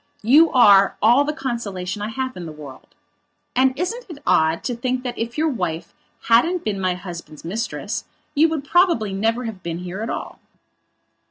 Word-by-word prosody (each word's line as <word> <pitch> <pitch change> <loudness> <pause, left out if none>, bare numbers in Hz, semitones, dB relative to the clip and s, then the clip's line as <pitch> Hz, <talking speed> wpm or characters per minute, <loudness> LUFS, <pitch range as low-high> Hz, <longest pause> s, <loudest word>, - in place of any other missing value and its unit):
You 300 +9 +6
are 200 -6 +6
all 240 +6 +5
the 300 - 0
consolation 210 -9 -4
I 210 - -2
have 260 +3 -4
in 175 -2 -7
the - - -7
world. 145 -4 -12 0.6
And 260 +1 +3
isn't 455 - -3
it 330 - -8
odd 160 +1 +2
to 245 - -2
think 250 +2 -2
that 245 -2 -4
if 235 +3 -4
your 315 +1 +2
wife 180 - -3 0.3
hadn't 325 +10 +3
been 200 -3 -2
my 185 -1 0
husband's 170 -4 -9
mistress, 215 +7 -4 0.3
you 320 +2 +4
would 315 -3 -3
probably 310 - +2
never 225 +5 0
have 220 -5 -6
been 170 -1 -4
here 180 +3 -6
at 225 - -3
all?" - - -5
230 Hz, 180 wpm, -21 LUFS, 185-265 Hz, 0.6 s, You